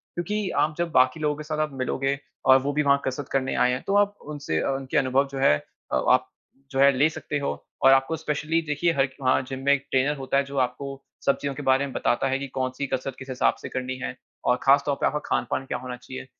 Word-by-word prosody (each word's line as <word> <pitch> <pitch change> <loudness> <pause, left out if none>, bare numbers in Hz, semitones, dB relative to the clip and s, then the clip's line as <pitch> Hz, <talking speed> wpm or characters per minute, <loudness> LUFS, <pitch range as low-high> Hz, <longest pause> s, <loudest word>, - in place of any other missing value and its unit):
क्योंकि 200 +3 -2
आप 155 0 -1
जब 170 -1 -1
बाकी 130 +2 +3
लोगों 150 -1 0
के 150 - -7
साथ 155 0 -4
आप 145 - -16
मिलोगे 135 +2 0 0.3
और 130 0 +8
वो 145 +2 -2
भी 150 +1 +1
वहाँ 140 -1 +3
कसरत 130 +1 -3
करने 130 -1 0
आएँ 125 - +3
हैं 130 - -3
तो 195 - +1
आप 205 0 -6 0.2
उनसे 140 - -2
उनके 135 -1 -2
अनुभव 135 +1 +2
जो 135 - -5
हैं 75 - +5 0.4
अ - - +2
आप - - +2 0.4
जो 135 - -2
है 140 0 +7
ले 145 +4 +4
सकते 155 -2 -4
हो 140 - -1 0.3
और 135 - +8
आपको 135 +4 +3
स्पेशली 155 +1 -1
देखिये 150 +3 +1
हर 140 -2 +2
वहाँ 130 0 +3
जिम 130 -1 -4
में 140 - +6
एक 140 -1 -1
ट्रेनर 135 +3 +2
होता 135 0 -1
है 140 - +3
जो 140 - -6
आपको 125 +3 -7 0.4
सब 140 - +3
चीज़ों 140 -1 -2
के 150 - -6
बारे 135 +1 +4
में 135 - -7
बताता 120 - +1
है 135 +1 0
कि 140 - -4
कौन-सी 130 +2 -2
कसरत 130 0 -3
किस 130 - -10
हिसाब 130 - +2
से - - -6
करनी 130 0 -3
है, - - -4 0.3
और 125 - +3
ख़ास 140 +1 +5
तौर 145 - +1
पे - - +3
आपका 150 - +1
खान-पान 120 +2 -1
क्या 125 - -3
होना 125 0 -6
चाहिए। 130 +1 -9
140 Hz, 250 wpm, -25 LUFS, 130-150 Hz, 0.4 s, और